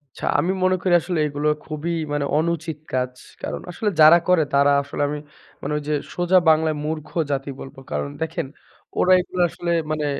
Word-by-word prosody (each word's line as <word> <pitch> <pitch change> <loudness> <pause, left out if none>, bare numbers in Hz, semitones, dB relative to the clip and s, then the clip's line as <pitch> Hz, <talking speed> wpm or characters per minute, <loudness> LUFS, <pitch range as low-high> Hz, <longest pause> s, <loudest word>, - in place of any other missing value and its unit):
আচ্ছা, - - -6
আমি 180 - +1
মনে 185 0 +3
করি 180 -1 +1
আসলে 175 -1 -2
এগুলো 145 +1 -2 0.2
খুবই 155 +2 -4 0.2
মানে, 145 -1 0
অনুচিত 160 -1 -1
কাজ। 125 0 0 0.3
কারণ - - -4
আসলে 210 +4 -1
যারা 155 +2 +9
করে, 180 -3 +4
তারা 140 0 +5
আসলে 140 +1 -5
আমি 150 0 -3 0.4
মানে, - - -3
ঐযে 150 0 -3 0.2
সোজা 175 +1 +3
বাংলায় 155 0 +3
মূর্খ 155 -1 -4 0.2
জাতি 140 0 -2
বলবো। 135 - -10
কারণ 75 -1 -2
দেখেন, 160 -3 -2 0.5
ওরা 185 - +4
এইগুলা 180 0 -1
আসলে 170 +1 -4 0.2
মানে, 155 -1 -1
155 Hz, 175 wpm, -22 LUFS, 145-170 Hz, 0.5 s, যারা